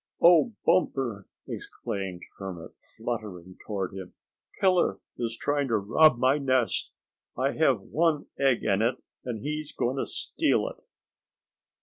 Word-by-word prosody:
"Oh, 175 +6 +6
Bumper," 130 - +1 0.2
exclaimed 95 -3 -5 0.2
Hermit, 95 -4 -7 0.3
fluttering 105 -6 -5
toward 95 -4 -3
him, 95 -2 -8 0.4
"Killer 185 -2 +3 0.2
is 115 -1 -2
trying 145 -1 0
to 115 -3 +2
rob 120 +7 +5
my 130 +4 +3
nest. 130 -4 +1 0.5
I 135 +2 +1
have 135 -9 +2
one 155 +6 +1
egg 135 -3 +3
in 100 -1 +2
it, 120 +3 +2 0.3
and 115 -4 -5
he's 150 0 -3
going 125 +3 -1
to - - -1
steal - - 0
it." - - -14
120 Hz, 130 wpm, -27 LUFS, 100-145 Hz, 0.5 s, Oh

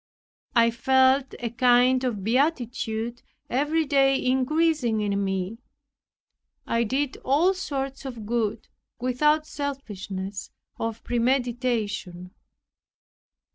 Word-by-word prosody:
I 230 0 +5
felt 260 +3 +3
a 235 -2 -3
kind 250 +1 +4
of 225 -6 -2
beatitude 240 - -1 0.3
every 295 +5 +1
day 270 -2 +3
increasing 260 -2 +1
in 200 -1 0
me. 195 +3 -2 1.1
I 230 0 +1
did 265 +4 -1
all 315 +8 +3
sorts 275 -8 -4
of 240 -5 -7
good, 225 -1 -1 0.3
without 300 +5 +2
selfishness 205 -10 -5 0.3
or 225 0 -1
premeditation. 235 -7 -1
245 Hz, 95 wpm, -25 LUFS, 225-275 Hz, 1.1 s, I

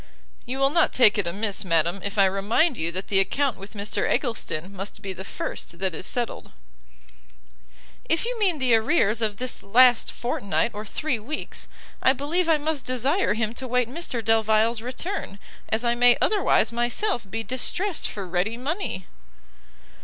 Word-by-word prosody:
"You 255 +2 -3
will 275 0 +3
not 335 +1 +3
take 215 -5 +5
it 195 - -1
amiss, 200 +3 -2
madam, 170 +1 +1
if 200 +1 -5
I 195 - +6
remind 205 - +2
you 170 -5 -2
that 185 +3 -5
the 195 - +3
account 265 +6 +1
with 200 +3 -11
Mr 205 +1 -2
Eggleston 200 - -2
must 200 +2 -7
be 195 -1 -4
the 190 - -7
first 170 -3 -6
that 190 0 -2
is 185 - -4
settled." 240 -1 -3 1.5
"If 330 +6 0
you 485 -1 -3
mean 375 -6 +2
the 260 -4 +2
arrears 225 -1 +3
of 210 -2 -1
this 255 +2 -4
last 245 +4 +5
fortnight 235 -2 -1
or 210 +1 -6
three 260 +3 -2
weeks, 285 +9 -6 0.3
I 260 - +5
believe 315 +6 -1
I 320 - +5
must 300 -1 -2
desire 255 - +1
him 220 -1 -1
to 260 +2 -6
wait 250 -1 +1
Mr 255 -6 -5
Delvile's 220 +1 +3
return, 255 - -5 0.3
as 225 +2 0
I 235 - +3
may 245 0 +5
otherwise 400 - +2
myself 240 - -1
be 225 +3 -3
distressed 325 - 0
for 200 -2 -6
ready 185 +6 -1
money." 275 - -3
230 Hz, 170 wpm, -25 LUFS, 200-270 Hz, 1.5 s, I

